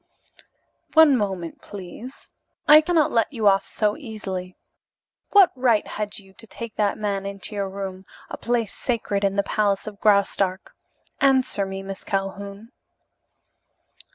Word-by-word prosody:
"One 315 -3 +7
moment, 190 -7 -3
please. 205 +6 -10 0.4
I 305 +1 +9
cannot 315 -2 +2
let 230 +2 +1
you 225 -6 0
off 195 -1 +3
so 210 -1 0
easily. 190 - -6 0.7
What 390 -3 +6
right 245 -5 +2
had 210 -1 -5
you 195 -1 -14
to 225 - -12
take 230 +1 -8
that 205 -2 +1
man 200 -2 -2
into 200 +2 -4
your 200 -1 -2
room, 190 -1 -7 0.2
a - - -6
place 235 -3 -1
sacred 220 -5 -2
in 195 0 +1
the 200 - +2
palace 200 -1 0
of 210 -2 -9
Graustark? 200 -2 +1 0.5
Answer 260 -7 +2
me, 195 0 -6
Miss 195 0 -7
Calhoun." 200 +3 -4
205 Hz, 140 wpm, -23 LUFS, 195-235 Hz, 0.7 s, I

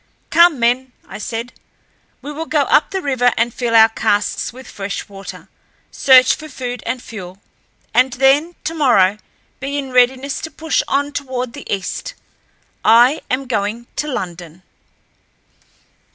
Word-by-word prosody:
"Come, 340 -3 +5
men!" 245 +2 +1
I - - -9
said. 230 +2 -5 0.7
"We 290 - -6
will 320 +2 -6
go 300 - +2
up 290 - +3
the 385 -1 -4
river 255 -3 +2
and 230 0 +1
fill 235 -2 -1
our 220 0 +8
casks 210 -2 -1
with 255 +2 -13
fresh 200 0 -5
water, 195 -1 -10 0.4
search 255 -1 +6
for 310 - -8
food 250 -3 -5
and 250 +2 -2
fuel, 190 -4 -9 0.5
and 255 +3 +4
then 280 +6 +2
tomorrow 240 - +2 0.4
be 275 +2 -3
in 270 -2 -4
readiness 255 +2 +2
to 320 - -5
push 320 -1 -1
on 285 +1 0
toward 255 -4 -4
the - - -9
east. 200 - -4 0.7
I 240 +6 +5
am 265 +2 -1
going 225 -1 -2
to 300 - -1
London." 175 - -6
250 Hz, 145 wpm, -18 LUFS, 225-280 Hz, 0.7 s, our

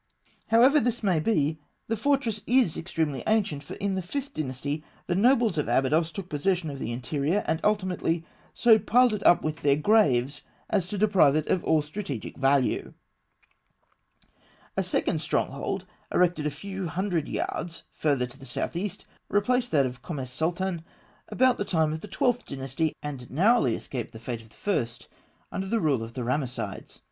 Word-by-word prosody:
However 250 +7 +6
this 240 -2 -1
may 185 -5 +3
be, 155 -4 +1 0.3
the 225 - -1
fortress 230 -3 0
is 245 -8 +3
extremely 160 -5 -2
ancient, 205 -10 +1
for 140 - -8
in 200 -1 -2
the 190 - -1
Fifth 280 +10 -4
Dynasty, 145 +1 -3 0.2
the 175 - -1
nobles 230 - +3
of 150 - -1
Abydos 150 +7 +2
took 190 0 -6
possession 165 +1 0
of 140 - -7
the 115 - -3
interior, 145 - -1
and, 160 - 0
ultimately, 185 -5 0 0.3
so 225 -2 +5
piled 240 +3 +4
it 210 - -3
up 175 - +6
with 155 0 -2
their 140 -1 +4
graves 145 - +3 0.3
as 195 -5 +1
to 205 - -4
deprive 190 -9 +4
it 155 -1 +1
of 185 - +1
all 155 -2 +3
strategic 150 - -6
value. 135 -1 +1 1.8
A - - +1
second - - 0
stronghold, - - -2 0.3
erected 175 -4 +2
a - - +1
few 190 +5 -5
hundred 175 -2 -1
yards 165 -1 -3
further 140 -5 +1
to 125 +2 -12
the - - -13
south - - -2
east, 190 +2 -4 0.2
replaced 245 +5 +2
that 140 -4 +4
of 125 0 -5
Kom 155 +4 -5
es 130 -1 -5
Sultan 170 +4 -1 0.5
about 255 -1 +3
the - - +1
time 160 -5 +1
of 160 - -5
the - - -8
Twelfth 245 +5 0
Dynasty, 135 +3 -2
and 135 -5 -6
narrowly 160 - +3
escaped 125 -2 -6
the 115 - -9
fate 115 0 -5
of 110 - -18
the - - -23
first, 120 - -2 0.4
under 190 - -3
the 230 +3 +1
rule 145 - +1
of 115 +1 -7
the 125 - -3
Ramessides. 130 +1 -3
165 Hz, 175 wpm, -27 LUFS, 140-205 Hz, 1.8 s, However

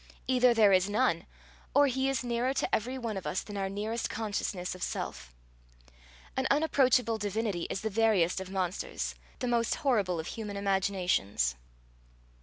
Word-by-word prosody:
Either 250 -1 +4
there 220 -4 +5
is 185 +1 +3
none, 205 -5 +1 0.5
or 285 - +7
he 265 0 +1
is 270 -3 -1
nearer 245 +2 0
to - - +1
every 250 +5 0
one 230 -5 -3
of 190 - -5
us 185 - -1
than 205 - -8
our 195 -1 -1
nearest 215 +4 -2
consciousness 200 -4 -3
of 185 - -11
self. - - -4 1.0
An - - +1
unapproachable 260 -6 +3
divinity 205 -3 -2
is 195 - -3
the 220 - -1
veriest 195 -5 +2
of 190 - -7
monsters, 185 -1 -2 0.2
the 250 - -3
most 235 -1 +1
horrible 205 - +1
of 160 - -4
human 210 +1 -5
imaginations. 185 - +1
210 Hz, 160 wpm, -30 LUFS, 190-240 Hz, 1.0 s, or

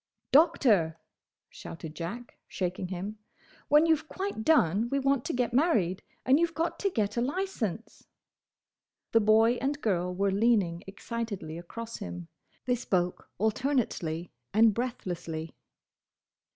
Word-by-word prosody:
"Doctor!" 240 - +4 0.5
shouted 160 -2 -9
Jack, 190 +10 -7
shaking 185 0 -3
him, 195 +4 -5 0.5
"when 300 +2 +6
you 325 -1 +5
've 315 +1 -10
quite 385 - -4
done, 225 - +3
we 275 - 0
want 275 -2 +1
to - - -1
get 245 -1 -1
married; 230 - +2 0.2
and 265 +4 +5
you 340 - +3
've 330 - -18
got 330 +2 -1
to 400 - +1
get 210 - -1
a - - +2
licence!" 245 - -3 1.0
The 225 - +5
boy 220 +3 +4
and 285 +2 -1
girl 180 -7 0
were 195 +2 0
leaning 195 -5 +2
excitedly 200 -4 -5
across 225 +7 -7
him. 85 -1 -7 0.4
They 250 - +2
spoke 180 -7 -1
alternately 215 - -1 0.2
and 220 0 +6
breathlessly. 175 -9 -4
220 Hz, 135 wpm, -29 LUFS, 180-265 Hz, 1.0 s, when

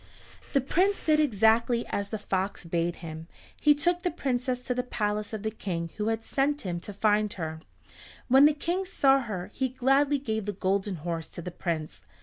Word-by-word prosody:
The 275 - +4
Prince 370 +9 +2
did 310 -1 +3
exactly 235 -2 +3
as 200 0 -2
the 220 - -3
fox 195 -2 -2
bade 170 +1 -1
him. 160 0 -7 0.3
He 295 -1 +6
took 350 +4 +1
the 355 - 0
Princess 255 -5 -1
to 250 - -2
the 250 - 0
palace 210 -3 -2
of 220 -2 -5
the 220 - -1
King 170 -6 -4
who 210 0 -1
had 225 0 -1
sent 290 +2 0
him 175 -3 -3
to 205 - -7
find 210 +1 +2
her. 160 -2 -5 0.7
When 270 +3 +7
the 300 0 +5
King 345 +6 -1
saw 275 -7 +3
her 210 -8 -5
he 260 0 -1
gladly 270 +3 +3
gave 220 -6 -3
the 205 - -2
Golden 195 +1 0
Horse 165 0 -4
to 170 - -8
the 180 - -5
Prince. 165 -3 -4
220 Hz, 195 wpm, -28 LUFS, 190-270 Hz, 0.7 s, When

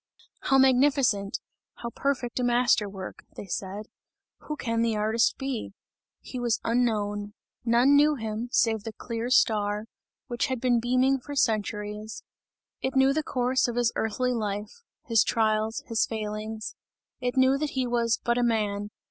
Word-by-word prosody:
"How 270 - +2
magnificent! 260 -6 +3 0.4
How 235 - -6
perfect 260 -3 -2
a - - 0
master 240 -3 +3
work!" 190 -1 -8
they - - -7
said. 195 +2 -4 0.6
"Who 300 - -2
can 230 -5 -1
the 230 -1 +1
artist 220 +2 +2
be?" 265 -7 -4 0.5
He 255 - -7
was 240 -2 +1
unknown. 210 -3 0 0.3
None 245 +4 +5
knew 300 +1 +5
him, 225 0 -4
save 225 -5 +2
the 225 - -6
clear 230 +1 -4
star, 210 -4 +2 0.4
which 240 -1 -1
had 260 -2 -2
been 245 -1 +2
beaming 255 +3 +2
for 285 +3 -8
centuries; 210 -3 -1 0.6
it 265 0 -2
knew 265 +1 +5
the 310 - +1
course 255 -2 +1
of 240 - -3
his 240 -1 +2
earthly 250 +3 0
life, 210 -1 -3 0.3
his 230 -4 +4
trials, 220 0 0
his 225 -1 +1
failings; 215 0 -4 0.5
it 250 0 -2
knew 260 +1 +4
that 300 -1 -2
he 260 - +2
was: 235 -1 +1
"but 240 0 +1
a - - +2
man!" 210 -3 0
230 Hz, 155 wpm, -27 LUFS, 215-255 Hz, 0.6 s, None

